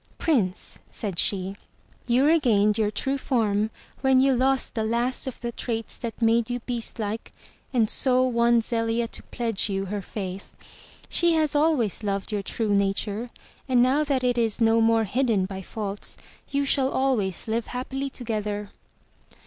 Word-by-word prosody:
"Prince," 215 - -1
said 195 -6 -4
she, 195 -1 +1 0.5
"you 250 +3 +3
regained 230 -10 +4
your 215 -1 +1
true 270 +6 -2
form 215 -5 +1 0.3
when 265 -1 +4
you 270 +1 +4
lost 265 +1 +1
the 220 - -1
last 240 +4 0
of 260 - -5
the 235 -1 -3
traits 225 -2 -4
that 230 0 -5
made 230 +1 +3
you 245 0 -2
beastlike 225 -2 -4 0.4
and 235 -4 +3
so 255 +3 +4
won 235 -1 +3
Zelia 230 0 -1
to - - -5
pledge 230 -3 -1
you 195 0 -1
her 205 +1 -3
faith. 190 0 -7 0.5
She 345 -1 +2
has 310 -2 +1
always 290 - +2
loved 200 0 -2
your 205 -1 -1
true 210 +1 -1
nature 200 +3 0 0.4
and 245 -1 +5
now 270 +4 +3
that 275 -3 0
it 245 -1 +2
is 225 -1 +1
no 225 0 +4
more 225 0 +4
hidden 225 -3 +1
by 190 0 -6
faults, 200 +1 -4 0.3
you 280 0 0
shall 270 -1 +2
always 235 -11 0
live 225 +1 -1
happily 265 +2 -4
together." 210 -5 -3
230 Hz, 160 wpm, -25 LUFS, 210-255 Hz, 0.5 s, and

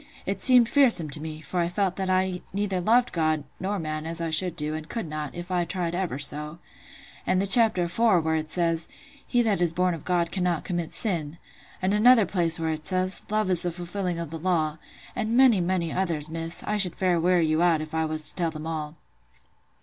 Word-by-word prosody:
It 195 0 -3
seemed 250 -3 +9
fearsome 235 - +5
to 150 - 0
me; 155 0 -7
for 170 +4 -4
I 170 - +1
felt 185 0 -1
that 190 -1 -2
I 185 0 +2
loved 180 -1 -6
neither 195 -2 -2 0.3
God 155 -3 0 0.2
nor 200 +3 -3
man 155 -2 -5
as 165 +1 -3
I 165 -1 -3
should 170 +2 +2
do, 150 -2 -3
and 155 0 -7
could 230 -8 -4
not, 150 -1 -6
if 175 +2 -8
I 180 -1 +1
tried 175 -1 -3
ever 175 -7 -3
so. 150 +2 -3 0.7
And 185 - +2
th' 200 - 0
chapter 220 -4 +4
afore, 185 +3 +2
where 160 0 -1
it 155 -1 -3
says,—'He 175 - -2
that 205 -5 0
is 175 -2 +2
born 180 +1 0
of 165 - -8
God 175 -2 -1
cannot 180 -4 -1
commit 175 -3 -4
sin.' 170 -7 -1 0.5
And 190 +2 +1
another 225 +1 +5
place 170 -4 0
where 160 -1 -1
it 155 0 -4
says,—'Love 185 +2 +1
is 175 - +1
the 175 - -2
fulfilling 175 +1 -4
of 170 -3 -6
the 165 - -6
Law.' 160 -3 -1 0.4
And 225 +2 -1
many, 250 -7 +5
many 175 -2 -1
others, 165 -5 -1
Miss: 165 +1 -1
I 210 - -2
should 185 -4 +1
fair 180 -2 +1
weary 175 0 +2
you 155 +1 0
out, 170 -3 +3
if 155 0 -8
I 160 0 0
was 155 0 -1
to - - -4
tell 170 -2 -1
them 155 -1 -8
all. 155 -1 -5
175 Hz, 220 wpm, -25 LUFS, 160-190 Hz, 0.7 s, seemed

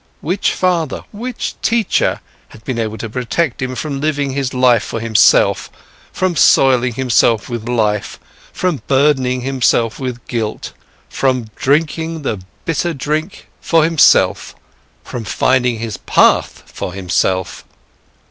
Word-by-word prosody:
Which 180 +6 0
father, 170 -6 -1
which 240 +3 -5
teacher 225 -3 +1 0.3
had 110 - -16
been 130 -3 -3
able 110 -1 -3
to 110 - -5
protect 125 +6 -2
him 130 0 -3
from 140 0 -4
living 145 -2 -1
his 135 -1 -2
life 125 -3 +3
for 115 - -5
himself, 110 -1 +3 0.4
from 185 -2 -1
soiling 125 -4 +4
himself 120 -4 +2
with 120 -1 -5
life, 105 -4 -1 0.3
from 180 -6 -2
burdening 130 -2 +2
himself 120 -3 0
with 125 -3 -5
guilt, 110 -3 -4 0.3
from 130 -5 -1
drinking 160 +3 -1
the 105 -8 -3 0.2
bitter 165 +1 -1
drink 155 +6 -3
for 165 -2 +3
himself, 160 -1 +3 0.5
from 120 - -6
finding 125 +2 +1
his 110 -3 -5
path - - +2
for 90 - -6
himself? 95 0 -1
130 Hz, 130 wpm, -16 LUFS, 115-155 Hz, 0.5 s, soiling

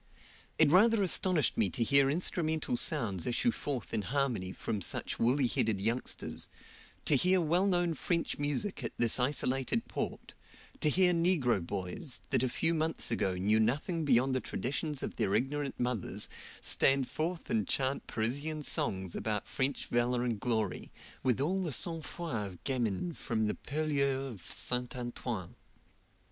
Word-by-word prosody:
It - - +5
rather 215 +4 +5
astonished 180 -4 +2
me 105 -4 +4
to 115 - -1
hear 140 +3 +4
instrumental 160 -3 0
sounds 100 -7 +1
issue 125 - +2
forth 140 - -4
in 110 - +1
harmony 115 -5 -1
from 105 +1 -4
such - - -2
woolly 130 +4 +3
headed 110 -4 +1
youngsters; 115 +5 -2 0.6
to - - +4
hear 185 +7 +4
well 175 +4 +2
known 175 -3 +1
French 170 +2 -1
music 145 +3 -2
at 115 - -4
this 120 +1 +3
isolated 135 - 0
port, - - -5 0.5
to 155 - +3
hear 180 +3 +4
negro 165 - +2
boys, 95 - -3
that - - +3
a 130 - +1
few 160 +6 0
months 160 0 -1
ago 95 -3 0
knew 105 +4 +2
nothing 150 - 0
beyond 130 -2 +3
the 130 - 0
traditions 145 +2 -3
of - - -5
their 100 - +1
ignorant 135 +4 -1
mothers, 125 -6 0 0.3
stand 135 -1 +3
forth 165 +4 -3
and 220 0 +1
chant 135 0 -1
Parisian 145 +7 -2
songs 95 - +2
about 105 -2 -2
French 135 +1 -2
valor 120 +1 +1
and 115 -4 -1
glory, 110 -6 -1 0.3
with 130 -2 +1
all 180 +8 0
the 170 -4 -2
sangfroid 160 - -2
of 90 -3 -12
gamins 130 - -1
from 115 -5 -1
the 105 - 0
purlieus 140 -3 -1
of 100 -6 -10
Saint 125 0 0
Antoine. 120 -6 -5
135 Hz, 155 wpm, -32 LUFS, 115-160 Hz, 0.6 s, It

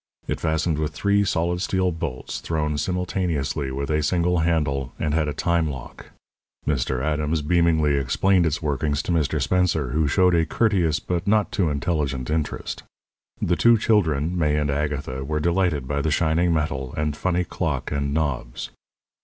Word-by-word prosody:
It - - -2
fastened 80 0 0
with 75 0 -2
three 100 0 +2
solid 90 -2 0
steel 95 -1 +1
bolts 80 -6 -5
thrown 75 -2 -1
simultaneously 85 -6 -1
with 70 +3 -3
a 75 0 +2
single 90 +2 +1
handle, 75 -5 0
and 75 -1 -1
had 80 -1 +1
a - - -1
time 85 -2 +1
lock. 65 -4 -8 0.6
Mr. 65 -3 0
Adams 75 +1 0
beamingly 80 -3 +2
explained 90 +7 +2
its 80 +2 -2
workings 75 0 0
to - - -3
Mr. 80 -4 +1
Spencer, 85 -7 +1
who 75 +3 +1
showed 90 +5 +3
a 85 -1 +4
courteous 90 -9 +1
but 90 +1 -3
not 105 0 +2
too 90 -5 +1
intelligent 70 -3 -1
interest. 80 -1 -2 0.6
The 85 - +1
two 115 +4 +5
children, 85 -7 +1
May 75 -4 +1
and 75 -1 0
Agatha, 70 -2 -2
were 75 +2 -2
delighted 85 -4 +1
by 70 +1 -1
the 80 - 0
shining 85 +3 +2
metal 75 -5 -1
and 75 -1 -1
funny 90 +2 0
clock - - -3
and 70 -1 -1
knobs. 70 -6 -2
80 Hz, 165 wpm, -23 LUFS, 75-85 Hz, 0.6 s, two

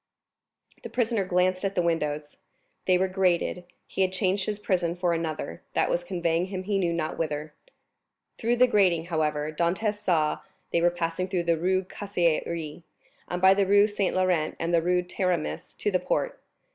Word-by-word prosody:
The - - -7
prisoner 230 -4 0
glanced 185 +1 +1
at 195 0 -1
the - - +3
windows—they 150 +2 -2
were 190 +1 +1
grated; 180 -1 0 0.2
he - - -3
had 185 -1 +3
changed 190 0 0
his 210 -1 -1
prison 175 -4 0
for 175 -1 +1
another 160 - -3
that - - +1
was 175 - 0
conveying 170 -1 0
him 185 -1 -5
he 200 0 0
knew 175 -3 +1
not 170 -2 -3
whither. 150 -1 -3 0.9
Through 235 +1 +1
the 250 +1 +6
grating, 185 -8 +3
however, 150 -1 0
Dantès 190 +7 0
saw 160 -6 +1 0.3
they 170 - +2
were 175 - +5
passing 175 +1 -2
through 185 -2 -1
the 170 0 +2
Rue 185 +3 +1
Caisserie, 170 -5 -2 0.5
and 180 - -3
by 190 +1 +7
the 195 -1 +1
Rue 205 +1 +6
Saint 205 -2 -1
Laurent 180 -4 +1
and 170 +1 -1
the 170 - +4
Rue 180 +1 +1
Taramis, 180 -2 -2
to 205 - 0
the 185 - +2
quay. - - 0
180 Hz, 175 wpm, -27 LUFS, 165-190 Hz, 0.9 s, by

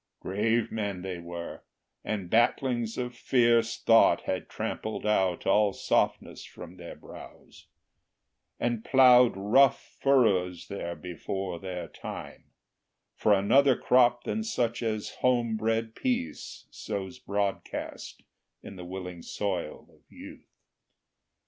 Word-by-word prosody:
Grave 110 +4 0
men 100 -4 -3
they 95 -2 -5
were, 85 0 -7 0.4
and 100 -4 -3
battlings 120 +2 +1
of 125 -1 -3
fierce 115 -2 +2
thought 115 0 +5
Had 95 - -4
trampled 110 - -4
out 95 -4 +1
all 100 0 +3
softness - - -1
from 90 +1 -12
their 85 -1 -9
brows, - - -14 0.9
And 120 -2 -1
ploughed 125 -2 +6
rough 120 +7 +4 0.2
furrows 100 -10 +2
there 85 -3 -5
before 90 +1 -5
their 90 -1 -6
time, - - -9 0.7
For 105 - +1
another 125 +7 +4
crop 120 -1 +3
than 220 - -2
such 120 - -1
as 110 -2 -3
homebred 115 -2 0
Peace 255 - -3
Sows 100 +4 -6
broadcast 100 -4 -4 0.4
in 95 - -10
the 90 - -8
willing 90 -1 -7
soil 90 -4 -4
of - - -25
Youth. - - -12
110 Hz, 115 wpm, -28 LUFS, 95-120 Hz, 0.9 s, ploughed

